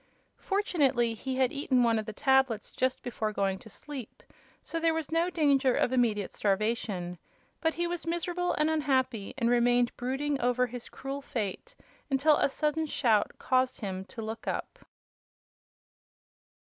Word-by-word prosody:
Fortunately, 280 Hz, -, +1 dB
he 260 Hz, +4 st, -4 dB
had 260 Hz, -1 st, +2 dB
eaten 260 Hz, -3 st, +2 dB
one 230 Hz, -1 st, +3 dB
of 215 Hz, -, -5 dB
the -, -, -3 dB
tablets 265 Hz, -1 st, +2 dB
just 260 Hz, 0 st, -1 dB
before 225 Hz, -3 st, -2 dB
going 195 Hz, -2 st, 0 dB
to 220 Hz, -, -13 dB
sleep, 270 Hz, 0 st, -9 dB, 0.4 s
so 330 Hz, -, -3 dB
there 325 Hz, 0 st, +2 dB
was 320 Hz, -1 st, -3 dB
no 335 Hz, +2 st, +2 dB
danger 280 Hz, -6 st, +3 dB
of 250 Hz, -, +1 dB
immediate 220 Hz, -6 st, +1 dB
starvation. 200 Hz, -4 st, -1 dB, 0.4 s
But 320 Hz, -1 st, 0 dB
he 345 Hz, -, 0 dB
was 345 Hz, -1 st, -4 dB
miserable 350 Hz, +1 st, -1 dB
and 300 Hz, -, +2 dB
unhappy, 260 Hz, -8 st, 0 dB
and 235 Hz, -3 st, +1 dB
remained 245 Hz, 0 st, +3 dB
brooding 270 Hz, +3 st, -1 dB
over 250 Hz, +1 st, +2 dB
his 245 Hz, 0 st, -7 dB
cruel 275 Hz, +1 st, -5 dB
fate 240 Hz, -, -4 dB, 0.3 s
until 290 Hz, +2 st, +4 dB
a -, -, +2 dB
sudden 305 Hz, +3 st, 0 dB
shout 230 Hz, -7 st, +2 dB
caused 255 Hz, -1 st, +1 dB
him 190 Hz, -2 st, -3 dB
to 225 Hz, +2 st, -8 dB
look 220 Hz, +1 st, -6 dB
up. -, -, -3 dB
255 Hz, 155 wpm, -29 LUFS, 225-300 Hz, 0.4 s, until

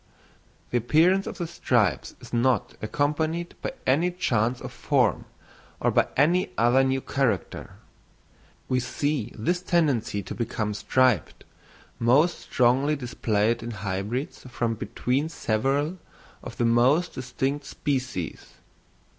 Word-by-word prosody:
The 120 Hz, -, +2 dB
appearance 170 Hz, -, +3 dB
of -, -, -6 dB
the 175 Hz, -, -2 dB
stripes 115 Hz, -, 0 dB
is -, -, -14 dB
not 120 Hz, -1 st, +1 dB
accompanied 155 Hz, +8 st, -1 dB
by -, -, -3 dB
any 155 Hz, +8 st, +3 dB
change 120 Hz, -9 st, 0 dB
of -, -, -8 dB
form, -, -, +1 dB, 0.5 s
or -, -, +2 dB
by -, -, +3 dB
any 175 Hz, +7 st, +3 dB
other 120 Hz, +3 st, +4 dB
new 135 Hz, 0 st, 0 dB
character. 125 Hz, -11 st, -2 dB, 0.9 s
We 130 Hz, -, +1 dB
see 125 Hz, -1 st, -2 dB
this 175 Hz, +11 st, 0 dB
tendency 140 Hz, -, +1 dB
to -, -, -6 dB
become 110 Hz, -2 st, -2 dB
striped 125 Hz, -, +1 dB, 0.6 s
most 140 Hz, +9 st, +3 dB
strongly 130 Hz, +4 st, +2 dB
displayed 115 Hz, -4 st, 0 dB
in 115 Hz, -, -5 dB
hybrids 105 Hz, +5 st, -4 dB
from 120 Hz, -2 st, -1 dB
between 125 Hz, +7 st, -2 dB
several 140 Hz, +7 st, -1 dB, 0.4 s
of -, -, -9 dB
the 120 Hz, -, +1 dB
most 130 Hz, +9 st, +3 dB
distinct 135 Hz, +3 st, -3 dB
species. 130 Hz, -, -3 dB
130 Hz, 120 wpm, -26 LUFS, 115-150 Hz, 0.9 s, other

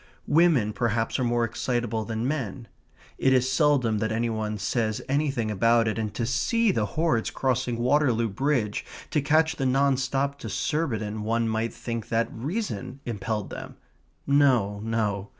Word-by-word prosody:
Women 150 Hz, -10 st, +3 dB
perhaps 115 Hz, +2 st, 0 dB
are -, -, +1 dB
more 120 Hz, -1 st, +1 dB
excitable 115 Hz, -1 st, -1 dB
than 115 Hz, +2 st, -2 dB
men. 130 Hz, -5 st, -3 dB, 0.5 s
It 130 Hz, -, +4 dB
is 130 Hz, 0 st, +2 dB
seldom 130 Hz, -6 st, +2 dB
that 110 Hz, +1 st, -1 dB
any 115 Hz, +1 st, 0 dB
one 110 Hz, -1 st, -2 dB
says 110 Hz, +2 st, -1 dB
anything 135 Hz, -6 st, 0 dB
about 115 Hz, +3 st, +3 dB
it, 110 Hz, +1 st, -1 dB
and 110 Hz, -2 st, -2 dB
to 120 Hz, -, -1 dB
see 205 Hz, -, +2 dB
the -, -, 0 dB
hordes 155 Hz, -9 st, +1 dB
crossing 130 Hz, -2 st, -1 dB
Waterloo 125 Hz, -2 st, +2 dB
Bridge 115 Hz, -1 st, 0 dB, 0.3 s
to 150 Hz, -, +2 dB
catch 160 Hz, +2 st, +2 dB
the 135 Hz, -, 0 dB
non 135 Hz, +1 st, +3 dB
stop 135 Hz, +2 st, -1 dB
to -, -, -6 dB
Surbiton 110 Hz, -9 st, -2 dB
one 115 Hz, +2 st, 0 dB
might 110 Hz, +1 st, -1 dB
think 115 Hz, -1 st, -5 dB
that 115 Hz, 0 st, +1 dB
reason 135 Hz, -, -4 dB
impelled 105 Hz, -2 st, -3 dB
them. -, -, -8 dB, 0.5 s
No, 130 Hz, -8 st, +3 dB
no. 105 Hz, -3 st, -1 dB
120 Hz, 160 wpm, -26 LUFS, 110-140 Hz, 0.5 s, It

